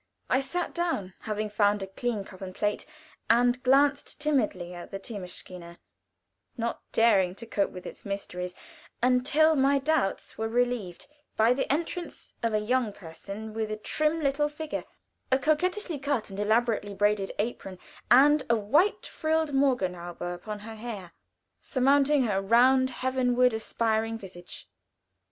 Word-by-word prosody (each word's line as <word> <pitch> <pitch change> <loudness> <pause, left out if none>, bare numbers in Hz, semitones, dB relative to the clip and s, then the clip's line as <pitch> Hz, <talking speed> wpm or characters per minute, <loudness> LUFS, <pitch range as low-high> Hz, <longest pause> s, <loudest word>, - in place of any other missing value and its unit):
I 260 - +4
sat 345 +6 -3
down, 330 - -2
having 215 0 -3
found 205 -1 +2
a - - -2
clean 210 +2 -3
cup 190 -1 -13
and 185 -1 -7
plate, 210 0 -1 0.4
and 245 +2 +4
glanced 280 +3 +2
timidly 215 - 0
at 175 -1 -9
the 195 - -5
theemaschine, 180 -4 -8 0.8
not 235 0 -2
daring 195 -6 +3
to 230 - -9
cope 205 -3 0
with 180 - -10
its - - -9
mysteries, 180 -3 -5 0.5
until 275 +6 +4
my 275 0 +4
doubts 275 -9 -1
were 225 - 0
relieved 240 -6 -1 0.3
by 225 +3 +5
the 270 - -1
entrance 335 +3 -3
of 230 - 0
a - - +3
young 240 +1 0
person 200 +5 -8
with 220 -1 -2
a 215 - -3
trim 310 +8 0
little 295 +1 +1
figure, 305 +1 -5 0.5
a 260 - +5
coquettishly 320 +4 0
cut 270 -7 -2
and 195 - -7
elaborately 215 -1 +1
braided 205 0 +1
apron, 205 -4 -3 0.3
and 290 +4 +6
a 235 - +5
white 290 - +2
frilled 315 -1 -1
morgenhaube 185 -11 0
upon 175 +4 -5
her 225 +1 -8
hair, 210 -6 -7 0.5
surmounting 280 +1 +3
her 200 -5 0
round, 255 +5 +4
heavenward 250 -1 +2
aspiring 225 0 -1
visage. 180 -4 -9
230 Hz, 145 wpm, -28 LUFS, 200-275 Hz, 0.8 s, and